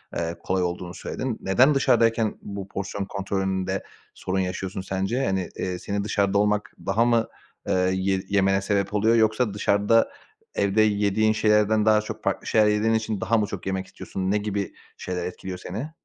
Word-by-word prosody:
eee, 85 Hz, 0 st, -2 dB
kolay 95 Hz, -1 st, 0 dB
olduğunu 90 Hz, 0 st, -3 dB
söyledin. 130 Hz, -4 st, -4 dB
Neden 130 Hz, +10 st, +4 dB
dışarıdayken 115 Hz, -4 st, +2 dB
bu 100 Hz, -1 st, -6 dB
porsiyon 100 Hz, 0 st, -4 dB
kontrolünde 95 Hz, -1 st, -2 dB, 0.3 s
sorun 95 Hz, 0 st, -2 dB
yaşıyorsun 95 Hz, +1 st, -3 dB
sence? 95 Hz, +8 st, -1 dB
Hani, 95 Hz, -4 st, -1 dB
eee, 90 Hz, -1 st, -3 dB
seni 100 Hz, 0 st, -2 dB
dışarıda 100 Hz, -1 st, +1 dB
olmak 105 Hz, +2 st, +1 dB
daha 110 Hz, +5 st, +2 dB
mı, 115 Hz, -1 st, +2 dB, 0.4 s
eee, 90 Hz, 0 st, +2 dB
ye 95 Hz, 0 st, 0 dB
yemene 95 Hz, -1 st, +3 dB
sebep 100 Hz, 0 st, 0 dB
oluyor, 110 Hz, +3 st, +3 dB
yoksa 110 Hz, 0 st, +2 dB
dışarıda 105 Hz, +2 st, +2 dB, 0.4 s
evde 100 Hz, +2 st, +2 dB
yediğin 105 Hz, +1 st, +2 dB
şeylerden 105 Hz, 0 st, +3 dB
daha 110 Hz, 0 st, +5 dB
çok 110 Hz, -, -7 dB
farklı -, -, -1 dB
şeyler 110 Hz, -1 st, +4 dB
yediğin 105 Hz, +2 st, +2 dB
için 110 Hz, -1 st, -1 dB
daha 115 Hz, +1 st, +2 dB
mı 105 Hz, -, +2 dB
çok 100 Hz, -2 st, -7 dB
yemek 95 Hz, 0 st, -2 dB
istiyorsun? 95 Hz, 0 st, -4 dB
Ne 105 Hz, -, +3 dB
gibi 100 Hz, -1 st, -3 dB, 0.2 s
şeyler 90 Hz, -1 st, -4 dB
etkiliyor 90 Hz, +1 st, -6 dB
seni? 110 Hz, -, -6 dB
100 Hz, 170 wpm, -25 LUFS, 95-110 Hz, 0.4 s, daha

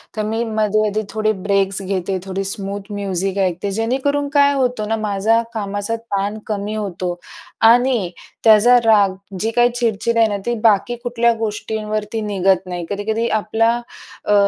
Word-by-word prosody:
तर 215 Hz, -, -1 dB
मी 225 Hz, +2 st, -1 dB
मध्ये 215 Hz, -2 st, +1 dB
मध्ये 215 Hz, +1 st, -1 dB
थोडे 215 Hz, 0 st, 0 dB, 0.2 s
ब्रेक्स 195 Hz, 0 st, +2 dB
घेते, 190 Hz, 0 st, -2 dB
थोडी 195 Hz, 0 st, -3 dB
स्मूथ 200 Hz, +1 st, -6 dB
म्युझिक 195 Hz, -1 st, -2 dB
ऐकते. 180 Hz, +3 st, -3 dB
जेणे 225 Hz, +5 st, 0 dB
करून 285 Hz, 0 st, +1 dB
काय 285 Hz, 0 st, +5 dB
होतो 250 Hz, -5 st, 0 dB
ना, 225 Hz, -, 0 dB
माझा 215 Hz, +1 st, +1 dB
कामाचा 205 Hz, 0 st, -3 dB
ताण 205 Hz, -2 st, -3 dB
कमी 210 Hz, 0 st, -3 dB
होतो 185 Hz, -4 st, -3 dB, 0.6 s
आणि 240 Hz, -6 st, +2 dB, 0.3 s
त्याचा 225 Hz, +3 st, +7 dB
राग 205 Hz, -4 st, +4 dB, 0.2 s
जी 225 Hz, +4 st, -1 dB
काही 240 Hz, +1 st, +4 dB
चिडचिड 235 Hz, -1 st, 0 dB
आहे 225 Hz, -1 st, +5 dB
ना, 205 Hz, -1 st, -2 dB
ती 240 Hz, -, 0 dB
बाकी 225 Hz, +2 st, +3 dB
कुठल्या 235 Hz, -1 st, +2 dB
गोष्टींवरती 215 Hz, 0 st, -3 dB
निघत 190 Hz, -3 st, +1 dB
नाही. 175 Hz, -1 st, -4 dB
कधी-कधी 220 Hz, +3 st, -1 dB, 0.2 s
आपला 225 Hz, +2 st, +2 dB, 0.5 s
अ, 210 Hz, -, +3 dB
215 Hz, 155 wpm, -19 LUFS, 200-230 Hz, 0.6 s, त्याचा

